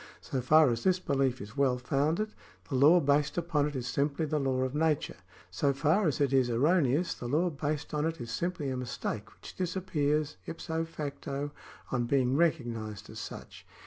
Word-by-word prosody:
So 130 - -3
far 150 +2 +5
as 115 0 -2
this 185 -1 +3
behef 135 -6 0
is 105 +4 -9
well 135 -3 +2
founded, 155 +11 0 0.4
the - - -5
law 145 +7 +6
based 145 0 +2
upon 160 -4 +1
it 150 - -6
is 125 -2 -3
simply 140 +4 0
the 155 0 0
law 130 -2 0
of 130 0 -2
nature; 155 -1 0 0.3
so 140 +9 +1
far 160 +8 +2
as 150 - 0
it 140 -2 +2
is 130 -2 +4
erroneous, 145 +5 +2
the 120 - -7
law 165 +7 +1
based 150 +1 -3
on 150 +1 +1
it 165 0 -4
is 120 -1 -6
simply 155 +1 -2
a 130 - -2
mistake 120 -4 -4
which - - -12
disappears 155 -5 -1
ipso 165 0 -3
facto 145 -2 -5 0.4
on 125 -2 0
being 130 -1 +2
recog 160 -5 +2
nised 110 -3 -6
as - - -8
such. - - -8
145 Hz, 190 wpm, -30 LUFS, 130-160 Hz, 0.4 s, law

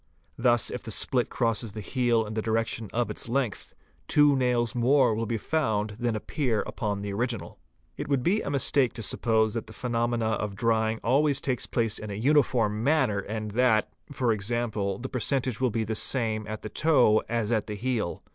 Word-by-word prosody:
Thus 120 -1 +2
if 125 - -5
the - - -8
split 125 +3 0
crosses 115 -3 -1
the 110 - -6
heel 120 +1 +1
in 105 - -6
the 110 - -1
direc 115 +1 +1
tion 115 -3 -5
of 120 +1 -1
its - - -5
length, 125 -4 -2 0.3
two 145 -1 +5
nails 125 -2 +1
more 125 0 +3
will 115 +1 -2
be 115 - -1
found 110 -6 -1
than 120 -2 0
appear 115 0 -1
upon 100 -2 -3
the 100 -1 -4
original. 115 -5 -3 0.4
It - - -4
would 140 -3 +1
be 200 +8 +2
a - - -4
mistake 140 -2 +3
to 115 - -6
suppose 110 +1 +1
that 115 -2 -4
the - - -11
phenomena 120 -1 -1
of 105 -2 -2
drying 110 +1 +1
always 140 +3 +3
take 130 -3 -2
place 115 -3 0
in 105 - -7
a 100 - -4
uniform 115 -4 +2
manner 130 -8 +2
and 110 +1 -5
that, 115 -1 +2 0.2
e.g., 115 -7 -1
the 115 -1 -2
percentage 130 -1 -1
will 130 - +3
be 115 0 -1
the 110 +1 -3
same 110 -2 -1
at 110 0 -6
the 110 - -5
toe 125 -5 +3
as 115 -1 -1
at 110 -3 0
the 105 - -4
heel. 115 -5 -2
115 Hz, 195 wpm, -27 LUFS, 110-125 Hz, 0.4 s, two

